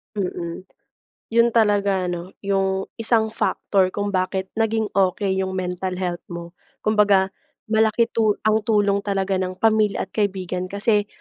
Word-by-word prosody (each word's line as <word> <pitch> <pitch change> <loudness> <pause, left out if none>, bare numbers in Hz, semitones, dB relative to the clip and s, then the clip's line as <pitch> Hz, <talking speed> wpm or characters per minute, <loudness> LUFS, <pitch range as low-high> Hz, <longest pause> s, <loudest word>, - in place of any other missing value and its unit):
Mm. 180 -3 -4 0.7
'Yon 235 +1 +4
talaga 200 -4 +3
'no, 175 +2 -6
'yong 195 -1 0
isang 220 -1 +2
factor 195 -3 +1
kung 205 0 -1
bakit 190 0 -1
naging 220 -1 0
okey 190 0 +1
'yong 190 0 -2
mental 185 0 -3
health 180 -1 -2
mo. 170 -1 -7 0.3
Kumbaga 205 -3 +3 0.4
malaki 220 +1 +3
tu 215 -2 +2
ang 215 0 +3
tulong 205 -2 +2
talaga 195 -1 -1
ng 185 0 -3
pamilya 215 0 +2
at - - -12
kaibigan 185 -3 -2
kasi 205 +1 +1
200 Hz, 140 wpm, -22 LUFS, 185-215 Hz, 0.7 s, Yon